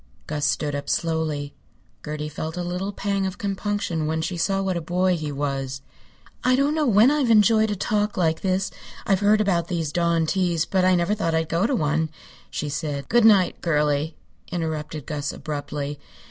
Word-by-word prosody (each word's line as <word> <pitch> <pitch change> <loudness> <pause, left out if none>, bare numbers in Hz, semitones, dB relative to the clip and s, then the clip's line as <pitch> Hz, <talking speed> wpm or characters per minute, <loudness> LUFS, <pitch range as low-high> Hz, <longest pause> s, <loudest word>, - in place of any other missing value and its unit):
Gus 145 -1 -2
stood 150 -1 0
up 145 0 -4
slowly. 160 -3 -1 0.5
Gertie 150 0 -4
felt 160 +2 -5
a 180 - -2
little 180 +3 -3
pang 200 -1 -1
of 190 +1 -6
compunction 200 -5 -2
when 160 +1 -1
she 175 +2 -2
saw 195 +3 0
what 190 -1 -1
a 170 - -2
boy 180 +3 +1
he 155 -3 -4
was. 135 -2 -3 0.6
"I 255 0 +4
don't 280 +3 +2
know 310 -2 +1
when 225 +4 +6
I've 290 -5 +1
enjoyed 220 0 +5
a 205 - -1
talk 210 +2 -1
like 160 -3 +1
this. 190 0 0 0.3
I've 195 -2 +2
heard 210 +1 +4
about 175 -5 +1
these 165 -4 -2
dawn 170 0 +2
teas, 170 -2 +1
but 190 -1 +1
I 185 0 +5
never 175 +3 +1
thought 170 -6 0
I'd 160 0 0
go 170 +6 +2
to 275 - 0
one," 160 -3 0 0.4
she 150 - -3
said. 145 -1 -3
"Good 240 -1 +4
night, 200 -5 +5
girlie," 150 -1 +1 0.4
interrupted 155 -3 -3
Gus, 145 -2 -3
abruptly. 145 -1 -5
170 Hz, 190 wpm, -24 LUFS, 150-200 Hz, 0.6 s, when